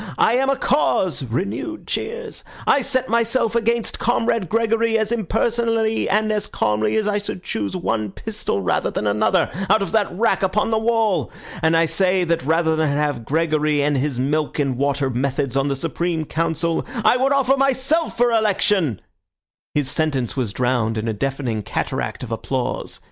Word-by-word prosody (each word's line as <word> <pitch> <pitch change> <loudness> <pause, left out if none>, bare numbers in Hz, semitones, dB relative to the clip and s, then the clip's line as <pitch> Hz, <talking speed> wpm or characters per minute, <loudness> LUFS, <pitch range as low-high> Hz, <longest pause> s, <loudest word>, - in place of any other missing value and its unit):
I 225 - +4
am 265 +2 +2
a 275 - +3
cause 220 - +1
(renewed 200 - -3
cheers). 470 +1 -4 0.2
I 280 - +4
set 260 -1 0
myself 230 0 +1
against 235 0 0
Comrade 230 -5 0
Gregory 225 0 +2
as 220 0 -1
impersonally 225 +1 0
and 215 +2 +2
as 210 -1 -1
calmly 105 0 0
as 215 -1 +1
I 210 0 +1
should 195 -3 -6
choose 105 - -3
one 110 - -1
pistol 210 - -3
rather - - +1
than - - -3
another 105 - +2 0.2
out 200 +1 +4
of - - -5
that 215 -2 +1
rack 225 +6 +1
upon 200 +4 +1
the 220 - +2
wall; 220 - +1 0.3
and 160 0 +3
I 165 - +4
say 185 +2 +2
that 170 -4 0
rather 160 +2 +2
than 155 -1 +1
have 145 -4 -1
Gregory 155 -1 +1
and 145 0 +1
his 135 -1 -1
milk 150 +3 -1
and 140 -4 0
water 140 0 0
methods 135 +1 -1
on 135 +1 +1
the 140 - 0
Supreme 165 +3 -2
Council, 165 +1 -1 0.2
I - - +6
would 265 +2 +1
offer 275 -1 +3
myself 275 +4 +1
for 240 0 +3
election—" 205 - +1 0.7
His 140 -3 0
sentence 140 -7 -1
was 125 -6 -1
drowned 120 -2 0
in 110 +1 -2
a 110 - 0
deafening 130 -1 -2
cataract - - -3
of - - -7
applause. - - -3
175 Hz, 175 wpm, -21 LUFS, 140-225 Hz, 0.7 s, I